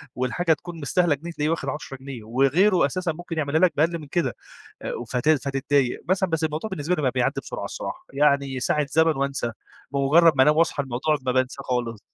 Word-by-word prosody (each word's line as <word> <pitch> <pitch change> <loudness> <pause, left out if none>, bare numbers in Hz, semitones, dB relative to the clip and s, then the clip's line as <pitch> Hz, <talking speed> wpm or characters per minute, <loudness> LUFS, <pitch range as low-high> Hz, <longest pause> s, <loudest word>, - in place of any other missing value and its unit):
والحاجة 130 +7 +1
تكون 170 +2 -8
مستاهلة 165 +1 +2
جنيه 170 +4 -8
تلاقيه 150 -1 -1
واخد 160 -4 -1
10 135 -1 -6
جنيه 130 -4 -9
وغيره 140 - +3
أساسًا 175 +5 -2
ممكن 170 0 -7
يعملها 150 +1 +1
لك 185 -2 +4
بأقل 165 +3 +2
من 150 - -10
كده. 140 -5 -1 0.7
و 120 - -5
ف 120 - -5
فت 135 +5 0
فتضّايق 140 -3 +1
مثلًا 190 0 +2
بس 165 -1 0
الموضوع 160 +7 -3
بالنسبة 175 -1 -1
لي 155 - -3
بقى 130 - +2
بيعدّي 125 -1 0
بسرعة - - -6
الصراحة، - - -6
يعني 140 -2 +2
ساعة 150 +3 +1
زمن 160 -1 +3
وأنسى 135 -3 -2 0.4
بمجرد 150 +4 +5
ما 130 - +6
أنام 150 +2 +4
واصحى 165 -3 +2
الموضوع 135 +4 0
ما 125 - +2
بانساه 130 +1 0
خالص. 120 -4 -2
145 Hz, 205 wpm, -24 LUFS, 135-165 Hz, 0.7 s, ما